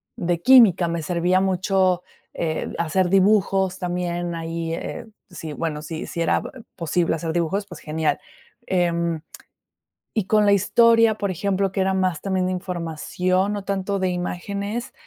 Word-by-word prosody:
de 170 -1 -1
química, 220 -8 +6
me 170 0 -2
servía 175 +3 +1
mucho, 185 -1 +1 0.3
eh, 160 -2 -3
hacer 175 +2 +1
dibujos 195 -1 +3
también 175 -1 -2
ahí, 165 0 -4
eh, 195 - -6 0.2
si, 165 -3 -7
bueno, 150 0 -3
si, 155 +1 -6
si 170 - -4
era 165 - +2
b - - -8 0.3
posible 170 0 0
hacer 160 0 -3
dibujos, 175 +4 -1
pues 180 -4 -11
genial, 155 0 -1 0.5
em, 170 -3 0 0.9
y 215 - +1
con 215 +1 +3
la 200 - +5
historia, 230 +3 +4
por 200 -2 -2
ejemplo, 195 +2 0
que 195 - -1
era 190 0 +1
más 185 -3 0
también 190 -2 0
de 185 - -1
información, 180 +2 -1
no 205 -1 -3
tanto 200 0 -2
de 185 - +1
imágenes, 200 +5 -4
180 Hz, 155 wpm, -23 LUFS, 170-195 Hz, 0.9 s, química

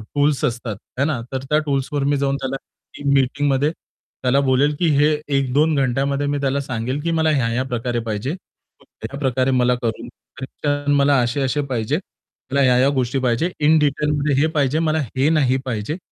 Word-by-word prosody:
Tools 145 -1 +2
असतात, 115 -3 -3 0.2
है 140 - +3
ना, 140 -6 -1
तर 130 0 -3
त्या 150 0 +3
टूल्सवर 140 0 -1
मी 145 +1 +1
जाऊन 140 0 0
त्याला 130 0 -2 0.4
टीम 140 -1 -1
मीटिंगमध्ये 140 +2 +2
त्याला 130 -4 -3
बोलेल, 140 +2 +2
की 175 - +2
हे 145 - +5 0.3
1-2 145 +4 +2
घंट्यामध्ये 140 +2 0
मी 145 - 0
त्याला 140 +1 0
सांगेल, 130 +1 -3
की 170 +2 -1
मला 160 -1 +2
ह्या-ह्या 125 -3 0
प्रकारे 120 0 -1
पाहिजे. 110 +4 -2 0.5
मग - - -21 0.2
त्याप्रकारे 130 +1 0
मला 125 -1 +3
करून 115 -3 -3 0.3
कनेक्शन 145 +2 -2
मला 140 0 +4
असे-असे 135 +4 0
पाहिजे. 120 +4 0 0.5
मला 140 +1 +2
ह्या-ह्या 130 +1 +4
गोष्टी 130 +1 0
पाहिजे, 130 +7 0
इन 155 +2 +4
डिटेलमध्ये 150 0 +1
हे 155 - +3
पाहिजे, 145 +1 +2
मला 160 -1 +1 0.2
हे 135 +3 +3
नाही 130 -3 +2
पाहिजे. 120 +5 -3
140 Hz, 170 wpm, -20 LUFS, 125-145 Hz, 0.5 s, हे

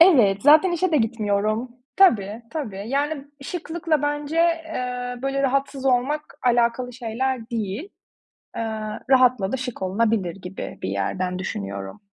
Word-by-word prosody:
Evet, 240 - +6
zaten 310 +5 +6
işe 345 +1 +1
de - - +5
gitmiyorum. 215 0 0 0.3
Tabii, 225 - +4
tabii. 210 -11 -4
Yani, 285 +1 -1 0.2
şıklıkla 325 -2 -2
bence, 295 +2 -2
eee, 255 -8 0
böyle, 275 0 0
rahatsız 275 0 0
olmak 270 +4 0
alakalı 240 +1 +2
şeyler 240 0 -3
değil. 215 - -2 0.8
Eee, 230 - -1 0.5
rahatla 255 -7 +4
da 265 - 0
şık 250 -5 -5
olunabilir 195 -2 +1
gibi 180 +1 -7
bir 95 - -2
yerden 180 - -2
düşünüyorum. 100 - -5
250 Hz, 130 wpm, -23 LUFS, 210-290 Hz, 0.8 s, Evet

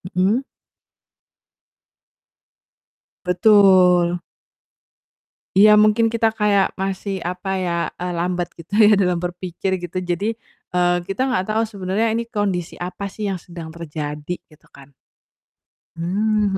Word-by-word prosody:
Mhm. 200 +8 +2 2.8
Betul. 180 -3 +5 1.4
Iya, 210 +1 +7
mungkin 215 +2 +4
kita 225 -1 +1
kayak 205 -3 +2
masih, 195 0 -3
apa 180 +2 -5
ya, 175 -2 -1 0.3
eee, 180 - -2
lambat 175 0 -1
gitu 170 +4 -13
ya 210 -1 +6
dalam 180 -3 +1
berpikir 180 +1 -3
gitu 180 +1 -5
jadi, 180 +5 -1 0.4
eee, 175 0 +3
kita 255 +8 -1
nggak 190 -7 0
tahu 220 - +2
sebenarnya 200 +2 -1
ini 230 +1 -1
kondisi 200 -6 -2
apa 180 +3 -5
sih 205 +1 -4
yang 190 - -2
sedang 170 -1 -10
terjadi 150 -1 -5 0.2
gitu 155 - -22
kan. 140 0 -16 1.0
Mmm, 200 +3 0
185 Hz, 115 wpm, -21 LUFS, 175-210 Hz, 2.8 s, Iya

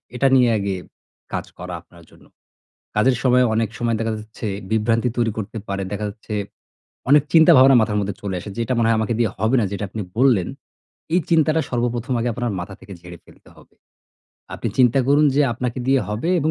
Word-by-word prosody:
এটা 135 +2 +2
নিয়ে 125 -2 +5
আগে 100 -1 -2 0.6
কাজ - - -2
করা 90 0 -7
আপনার 85 +1 -19
জন্য - - -20 0.7
কাজের 125 +5 +3
সময় 125 -1 +4
অনেক 110 -1 0
সময় 115 -1 0
দেখা 115 0 -1
যাচ্ছে 110 +1 -8 0.2
বিভ্রান্তি 115 +2 +1
তৈরি 115 -2 +1
করতে 110 +1 -5
পারে। 100 0 -3
দেখা 105 +1 -3
যাচ্ছে 105 +1 -9 0.8
অনেক 145 0 +6
চিন্তা-ভাবনা 155 -5 +7
মাথার 105 -1 0
মধ্যে 100 -1 -3
চলে 100 -2 -4
আসে। 105 - -9
যেটা 115 +2 -1
মনে 115 -1 +2
হয় 115 - +3
আমাকে 110 +1 -1
দিয়ে 115 -3 +2
হবে 110 +5 +1
না। 110 - +1
যেটা 100 +1 -4
আপনি 110 - -5 0.2
বললেন, 120 -8 +3 0.7
এই 180 - +4
চিন্তাটা 160 -1 +3
সর্বপ্রথম 120 0 -2
আগে 120 +1 -1
আপনার 120 0 -2
মাথা 90 +3 -7
থেকে 100 - -11
ঝেড়ে 90 0 -11
ফেলতে - - -20
হবে। - - -21 0.8
আপনি - - -3
চিন্তা 125 0 +4
করুন 145 +2 +4
যে, 145 - +3
আপনাকে 125 +1 -4
দিয়ে 135 0 +3
হবে 105 +10 -3
এবং 155 +2 +1
115 Hz, 195 wpm, -21 LUFS, 105-130 Hz, 0.8 s, চিন্তা-ভাবনা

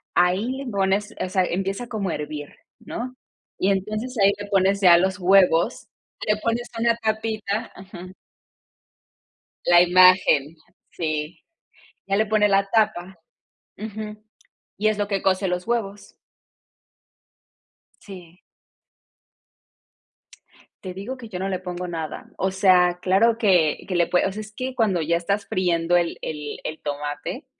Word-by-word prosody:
ahí 185 +5 +2
le 270 0 -6
pones 195 +1 0
o - - -1
sea, 185 0 +1
empieza 195 +6 -3
como 215 -5 -3
a - - -2
hervir, 150 -1 -7 0.2
¿no? 250 +2 -6 0.4
Y 195 - +2
entonces 215 +6 -3
ahí 195 - +6
le 205 - -6
pones 195 0 +2
ya 180 -3 +7
los 190 +2 0
huevos, 180 -2 +3 0.4
le 210 0 +1
pones 230 +2 -2
una 230 0 +2
tapita 220 -1 -3
ujú. 185 -1 -11 1.5
La 175 0 +6
imagen, 180 -4 +5 0.4
sí. 155 -1 -3 0.7
Ya 195 - +1
le 215 - +2
pones 210 -1 +2
la 195 0 +2
tapa 210 -4 +1 0.6
ujú, 215 0 -7 0.6
y 210 +2 +1
es 215 - -1
lo 205 -1 -1
que 200 -2 -1
cuece 190 0 +1
los 180 0 -2
huevos. 205 -4 -3 1.9
Sí. 180 -3 -12 2.4
Te 185 -2 -6
digo 205 +8 -6
que 240 -3 -10
yo 185 -4 -6
no 190 +1 -2
le 185 -2 -2
pongo 180 0 -5
nada. 165 -3 -6
O 190 - 0
sea, 180 -2 +4
claro 220 +5 +3
que 180 -9 +3
que 185 - -3
le 170 -1 +3
puede 180 - +2
o - - -3
sea, 210 +3 -6
es 215 0 -11
que 255 +2 -4
cuando 210 -8 +1
ya 170 +2 +1
estás 200 +4 -2
friendo 175 -2 +1
el 170 -1 -1
el 150 -2 -5
el 155 - -5
tomate, 145 - -5
190 Hz, 145 wpm, -23 LUFS, 175-215 Hz, 2.4 s, ya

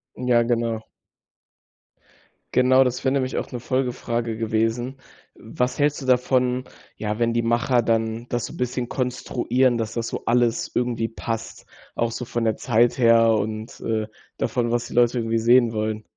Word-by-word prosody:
Ja, 125 -2 +2
genau. 115 -2 -1 1.7
Genau, 130 +1 +5
das 125 0 -2
wäre 130 - +2
nämlich 130 -1 -1
auch - - -4
'ne 125 - -4
Folgefrage 120 -2 -2
gewesen. 115 +3 -1 0.4
Was 125 0 -3
hältst 145 0 +1
du - - -6
davon, 125 0 +2 0.3
ja, 105 0 -3
wenn 115 0 +1
die 120 - +1
Macher 120 +2 +2
dann 115 0 -1
das 120 -1 -1
so - - -9
bisschen 125 -1 -2
konstruieren, 125 -1 0
dass 110 -1 -3
das 115 -1 -2
so - - -5
alles 120 -1 +1
irgendwie 120 -2 -1
passt, 115 0 -5 0.3
auch 115 0 0
so 125 - -5
von 120 -1 -2
der 110 - +1
Zeit 120 -1 +2
her 115 -2 +5
und, 110 +1 -3
äh, 110 -1 -1 0.3
davon, 120 -1 -1
was 120 0 -1
die - - -10
Leute 120 0 +3
irgendwie 115 0 0
sehen 120 0 +4
wollen? 110 0 -2
120 Hz, 165 wpm, -23 LUFS, 115-125 Hz, 1.7 s, Genau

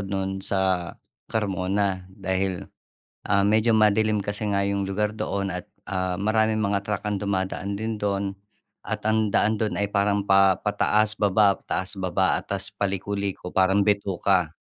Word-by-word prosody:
no'n 95 0 -3
sa 95 -3 0 0.4
Carmona. 95 -2 -1
Dahil, 95 -1 -2 0.7
ah, 100 -1 +3
medyo 110 +2 +3
madilim 110 0 +3
kasi 105 +1 -3
nga 100 0 +1
'yong 100 -1 -1
lugar 105 +2 -1
doon 100 -3 -2
at, 90 -1 -6 0.2
ah, 95 -1 -2
maraming 110 +2 +1
mga 100 -1 0
truck 105 -2 -2
ang 105 -2 -2
dumadaan 100 0 -2
din 110 0 -3
do'n 100 -1 -1 0.5
at 110 -1 -4
ang 110 -1 +2
daan 110 0 +2
do'n 110 -2 -1
ay 100 0 0
parang 100 0 +1
pa 95 -2 +5
pataas, 105 +1 +1
baba, 100 0 +3
taas, 95 +2 -2
baba 95 0 +1
at - - -23
tas - - -2
paliko-liko, 100 -1 -3
parang 95 +1 +3
bituka. 95 -4 +1
100 Hz, 150 wpm, -25 LUFS, 95-105 Hz, 0.7 s, pa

